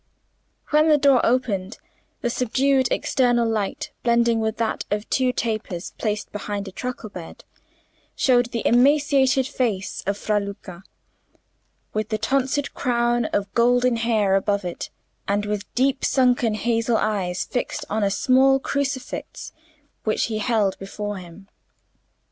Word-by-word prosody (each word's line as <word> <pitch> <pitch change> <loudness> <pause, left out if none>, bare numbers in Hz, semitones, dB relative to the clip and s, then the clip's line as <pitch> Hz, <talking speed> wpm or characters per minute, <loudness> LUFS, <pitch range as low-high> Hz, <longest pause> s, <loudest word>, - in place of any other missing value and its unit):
When 305 +1 +4
the 300 - +6
door 275 -3 +4
opened, 220 -6 0 0.4
the 240 - -1
subdued 260 +2 +2
external 245 -2 +2
light 215 -3 -2
blending 235 -1 +2
with 220 0 -1
that 225 -1 -1
of 210 +1 -2
two 255 -1 +2
tapers 215 -7 -3
placed 210 -1 -2
behind 205 -1 -4
a - - -7
truckle 240 0 -6
bed, 175 -4 -10 0.7
showed 245 -2 +3
the 240 -1 -4
emaciated 270 +1 +4
face 225 -8 -2
of 200 0 0
Fra 210 0 0
Luca, 195 -3 -8 1.1
with 215 0 -2
the 215 - 0
tonsured 270 +5 0
crown 240 -2 +1
of 200 -2 -2
golden 245 0 +3
hair 220 -4 +1
above 200 0 +1
it, 175 - -5 0.4
and 205 +1 0
with 205 0 -4
deep 265 +1 +1
sunken 245 -4 +2
hazel 230 +1 +1
eyes 190 -5 -1
fixed 245 - -3
on 215 0 -1
a 200 - +3
small 265 +5 +4
crucifix 270 -1 -4 0.5
which 215 - +1
he 215 - -1
held 215 -3 +1
before 205 +1 -5
him. 180 +2 -12
230 Hz, 135 wpm, -23 LUFS, 205-255 Hz, 1.1 s, the